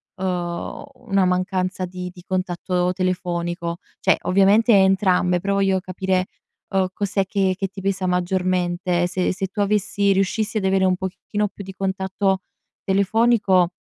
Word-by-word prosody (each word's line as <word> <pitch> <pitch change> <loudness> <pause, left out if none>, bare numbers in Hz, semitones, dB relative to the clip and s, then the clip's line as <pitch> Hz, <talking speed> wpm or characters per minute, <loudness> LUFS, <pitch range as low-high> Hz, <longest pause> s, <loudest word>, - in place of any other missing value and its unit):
uhm, 180 -2 -3 0.2
una 195 -3 +3
mancanza 185 0 0
di 180 0 -6
di 180 -1 -14
contatto 180 -1 -1
telefonico? 175 -2 -2 0.2
Cioè, - - +3
ovviamente 200 +5 +4
entrambe, 190 -2 +3
però 200 +2 -1
voglio 195 -1 +2
capire, 185 0 -1 0.4
uhm, 190 -1 +1
cos'è 200 -1 -1
che 190 -1 0
che 195 -1 -1
ti 195 0 -10
pesa 195 -1 -1
maggiormente, 180 -1 0
se 180 +1 -1
se 190 +1 -3
tu 195 - -9
avessi 200 0 +1
riuscissi 210 +4 0
ad 200 - -1
avere 190 0 +3
un 185 -1 +3
pochettino 195 +3 -3
più 200 - -10
di 190 0 -9
contatto 190 0 -1 0.4
telefonico, 200 -2 +3
190 Hz, 145 wpm, -22 LUFS, 180-195 Hz, 0.4 s, ovviamente